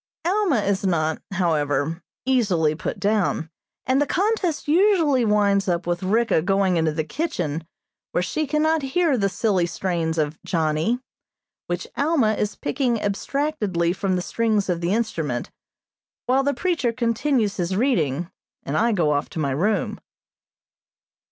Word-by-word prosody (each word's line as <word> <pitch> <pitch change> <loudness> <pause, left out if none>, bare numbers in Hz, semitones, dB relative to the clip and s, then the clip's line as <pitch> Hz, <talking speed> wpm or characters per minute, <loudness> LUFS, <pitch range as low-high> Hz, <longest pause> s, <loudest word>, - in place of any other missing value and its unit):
Alma 360 - +2
is 200 -1 0
not, 160 -4 0
however, 160 -2 0 0.2
easily 200 -12 +2
put 155 - -4
down, 200 -6 0 0.3
and 260 +3 +2
the 290 - +1
contest 380 -6 0
usually 325 - +4
winds 205 -2 +2
up 175 0 0
with 175 0 -1
Ricka 215 -1 +2
going 195 0 +2
into 160 -2 +2
the 155 +1 -2
kitchen 165 - -3 0.4
where 180 - 0
she 310 +10 -2
cannot 315 +2 +2
hear 285 +2 +1
the 200 -4 +1
silly 190 -3 +1
strains 170 -3 -2
of 155 0 -1
"Johnny," 160 +7 0 0.7
which 175 0 -3
Alma 280 -7 +2
is 210 -1 -2
picking 245 -4 -1
abstractedly 205 - -1
from 190 0 -1
the 180 - -1
strings 215 -3 0
of 175 -1 0
the 170 +1 0
instrument, 165 - -2 0.7
while 260 +2 +3
the 280 0 0
preacher 320 -6 0
continues 230 -1 0
his 180 0 -1
reading, 175 - 0 0.3
and 140 - -3
I 230 +1 +3
go 165 -7 +2
off 145 0 0
to - - -6
my 140 -3 0
room. 200 +10 0
200 Hz, 145 wpm, -23 LUFS, 170-260 Hz, 0.7 s, usually